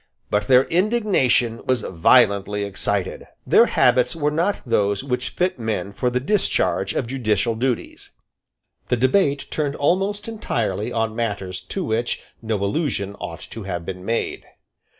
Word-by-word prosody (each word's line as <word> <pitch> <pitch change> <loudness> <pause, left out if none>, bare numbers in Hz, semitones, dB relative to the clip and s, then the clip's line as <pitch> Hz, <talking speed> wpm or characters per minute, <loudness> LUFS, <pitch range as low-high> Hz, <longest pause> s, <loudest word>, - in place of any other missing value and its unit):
But 105 - +1
their 130 -1 +6
indignation 175 - +1
was 130 -2 +2
violently 100 +2 +3
excited. 100 -1 -3 0.2
Their - - +6
habits 125 +4 +3
were 150 -2 0
not 170 +7 0
those 100 -3 +1
which 125 -1 -2
fit 180 -6 -1
men 110 -3 -2
for 125 +4 0
the 125 +1 0
discharge 125 - 0
of - - 0
judicial 115 -3 0
duties. 125 +2 -3 0.8
The 125 - +1
debate 140 - +2
turned 145 -2 -1
almost 195 +7 0
entirely 115 - -2
on 110 -1 -1
matters 100 -5 -3
to 195 - -3
which 120 -4 -1 0.2
no 110 -1 -1
allusion 100 - -1
ought - - -6
to 115 - -7
have 90 -3 -4
been 90 0 -6
made. 115 +4 -2
120 Hz, 145 wpm, -22 LUFS, 105-145 Hz, 0.8 s, their